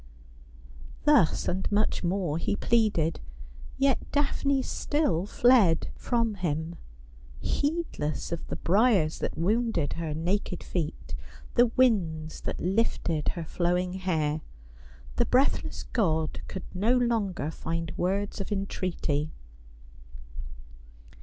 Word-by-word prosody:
Thus 295 - +4
and 190 +3 -1
much 210 -1 +1
more 175 -3 0
he 205 - 0
pleaded, 205 -9 +2 0.6
yet 275 -1 +3
Daphne 280 -1 +1
still 205 - 0
fled 220 -9 +4
from 230 -3 0
him, 165 -3 -3 0.6
heedless 290 - -2
of 170 - -4
the - - -4
briers 195 -5 +3
that - - -3
wounded 205 -4 +1
her 160 -3 -3
naked 180 +2 -1
feet, 165 -4 -4 0.4
the 240 0 +5
winds 185 -11 +1
that - - -4
lifted 180 -5 0
her 170 -2 -3
flowing 180 +2 0
hair. 160 -5 -1 0.8
The - - +3
breathless 265 +3 +1
god 160 -9 0
could 190 - -6
no 220 +7 +2
longer 210 -10 0
find 165 0 -3
words 200 +3 -1
of 195 - -6
entreaty. 180 -6 -1
185 Hz, 105 wpm, -28 LUFS, 165-230 Hz, 0.8 s, the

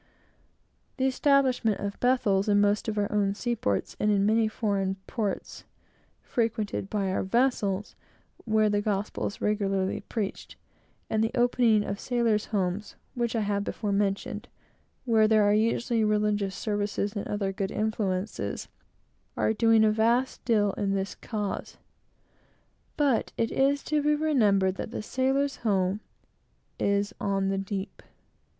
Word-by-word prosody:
The 260 - +1
establishment 260 -5 +2
of 200 0 -4
Bethels 215 -6 +2
in 205 0 +4
most 205 +2 +2
of 215 -1 -2
our 205 -1 0
own 200 -1 +1
seaports, 215 - -1
and 210 - +2
in 200 -1 +3
many 220 +1 +3
foreign 200 -3 -1
ports 215 -5 -4 0.6
frequented 220 -4 -2
by 200 -3 -1
our - - 0
vessels, 210 -3 0 0.5
where 215 -1 +3
the 205 0 +1
gospel 205 -1 -2
is 200 - -8
regularly 195 -2 0
preached 210 -4 -5 0.5
and 220 0 +1
the 225 - +1
opening 240 -3 +3
of 200 +1 -4
"Sailors' 235 -4 +1
Homes," 195 0 -2 0.2
which 235 -1 -1
I 225 - +1
have 200 -1 0
before 210 0 -3
mentioned, 200 0 -1 0.6
where 220 -3 +4
there 215 -1 +4
are 205 0 +4
usually 230 +1 +1
religious 210 -2 +1
services 205 -1 -2
and 205 - -3
other 200 -2 -2
good 190 0 -2
influences, 210 -3 -2 0.7
are - - +2
doing 225 0 +4
a 215 - +4
vast 235 +4 +1
deal 210 -4 +3
in 195 -1 0
this 195 0 -2
cause. 210 -4 -5 1.2
But 280 -6 +1
it 230 - 0
is 275 +1 +2
to 300 -1 0
be 300 +1 +3
remembered 210 -11 +2
that - - -4
the 220 - -5
sailor's 270 +4 0
home 195 -2 0 0.8
is 200 +1 +1
on 195 -1 0
the 195 0 0
deep. 195 0 -5
210 Hz, 145 wpm, -27 LUFS, 200-230 Hz, 1.2 s, in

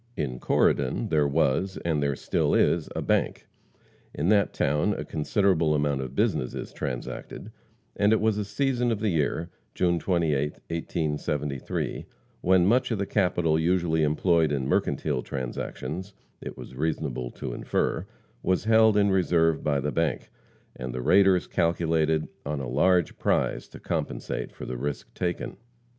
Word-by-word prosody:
In 65 -4 -3
Corydon 65 0 +1
there 75 -2 +3
was, 75 +7 +1
and 80 -3 +1
there 70 -1 0
still - - 0
is, - - +2
a - - -2
bank. - - 0 0.7
In 80 +5 0
that 100 -2 +4
town 75 +2 +1
a - - -5
considerable 80 -1 +1
amount 70 -2 0
of 65 0 -6
business 85 - 0
is - - -6
transacted, 65 -3 -6 0.4
and 105 +1 +3
it 110 - +4
was 110 -1 +2
a - - 0
season 125 +3 0
of 110 - -1
the 110 0 0
year 80 +2 -1 0.2
June 85 -2 +2
28th, 75 -5 0
1873 75 -4 -2 0.3
when 90 -1 +4
much 120 +6 +3
of 115 - 0
the 100 - -1
capital 90 -6 +1
usually 85 -1 +1
employed 80 +1 +2
in 70 -2 -1
mercantile 70 -5 0
transactions 70 +10 -5 0.3
it - - -7
was - - -10
reasonable 70 -3 -2
to - - -6
infer - - -1 0.3
was 95 -1 +1
held 110 -1 +5
in 100 -1 +4
reserve 85 -4 +2
by 70 -2 +1
the 75 +2 -2
bank, 80 0 -1 0.4
and 65 0 -6
the 65 - -3
raiders 95 0 +5
calculated 80 -2 +1 0.2
on 75 0 -3
a 65 - -4
large 85 +7 +2
prize - - 0
to - - -12
compensate - - -3
for - - -9
the 65 - -4
risk 70 +3 -4
taken. 90 -1 -3
80 Hz, 155 wpm, -26 LUFS, 70-95 Hz, 0.7 s, held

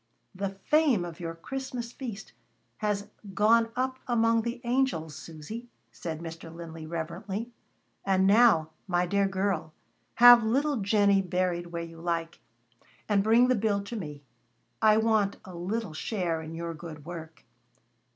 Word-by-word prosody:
"The 195 +1 -2
fame 295 - +3
of 170 0 -8
your 165 -1 -5
Christmas 250 +4 -5
feast 230 -6 -7 0.4
has 205 -1 -2 0.3
gone 225 +4 +4
up 260 +1 -1
among 230 -1 +3
the 235 +2 -4
angels, 240 - 0
Susy," 165 +10 -8 0.2
said 160 -2 -6
Mr. 165 0 -8
Linley 165 -1 -8
reverently. 175 +7 -4 0.5
"And 190 -1 +2
now, 200 -7 +5 0.2
my 175 -1 +1
dear 200 +2 +2
girl, 190 -5 -1 0.4
have 245 0 +9
little 275 +6 +1
Jennie 200 -1 +3
buried 180 -1 -1
where 170 0 -4
you 165 0 -10
like, 165 -1 -2 0.7
and 200 -2 +3
bring 230 +4 +5
the 255 - +4
bill 205 -3 0
to 215 +4 -7
me. 150 -8 -6 0.6
I 215 -1 +6
want 220 -3 +2
a 185 - -10
little 185 +2 -3
share 170 -1 -2
in 160 +1 -7
your 170 0 -4
good 155 -2 -10
work." 165 -3 -9
195 Hz, 145 wpm, -28 LUFS, 165-230 Hz, 0.7 s, have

